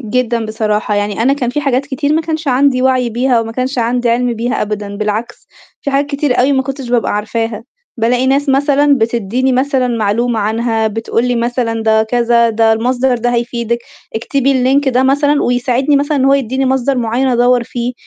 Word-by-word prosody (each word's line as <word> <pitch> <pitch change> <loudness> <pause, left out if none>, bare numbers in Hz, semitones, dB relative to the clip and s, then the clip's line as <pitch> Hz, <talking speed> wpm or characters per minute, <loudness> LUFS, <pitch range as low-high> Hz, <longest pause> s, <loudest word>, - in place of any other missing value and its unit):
جدًا 235 -1 -1
بصراحة، 215 -1 -1
يعني 205 +1 -1
أنا 265 +4 +3
كان 265 -4 -1
في 295 - -2
حاجات 275 -1 0
كتير 285 +1 -1
ما 315 - +2
كانش 315 -1 -3
عندي 255 0 +2
وَعي 255 -2 +1
بيها 245 +2 +1
أو 230 - -1
ما 225 - -7
كانش 255 +2 -3
عندي 240 +1 0
عِلْم 245 +1 +1
بيها 235 +2 -2
أبدًا، 205 -1 -4
بالعكس 215 +2 -4 0.4
في 280 - -2
حاجات 280 +1 +1
كتير 280 -3 0
أوي 265 +3 +3
ما 265 -1 +2
كنتش 270 -1 -6
ببقى 240 -2 +1
عارفاها، 225 +1 -3 0.3
بالاقي 245 +2 +1
ناس 275 +2 +1
مثلًا 285 +1 +3
بتدّيني 235 +3 0
مثلًا 260 0 +1
معلومة 230 +1 0
عنها، 225 +1 0
بتقولي 230 +3 -1
مثلًا 235 -1 -1
ده 220 0 +3
كذا، 235 0 +2
"ده 225 0 +2
المصدر 245 +2 0
ده 245 +1 0
هيفيدِك، 235 0 -2 0.4
اكتبي 275 +4 0
اللينك 265 +2 +2
ده 255 0 +2
مثلًا،" 285 +2 +2
ويساعدني 250 +3 +1
مثلًا 285 +1 0
إن 260 - +1
هو 275 +1 +4
يدّيني 265 0 -1
مصدر 265 0 0
معيّن 240 +3 0
أدوّر 245 0 +3
فيه، 240 +1 -4
245 Hz, 190 wpm, -14 LUFS, 230-265 Hz, 0.4 s, هو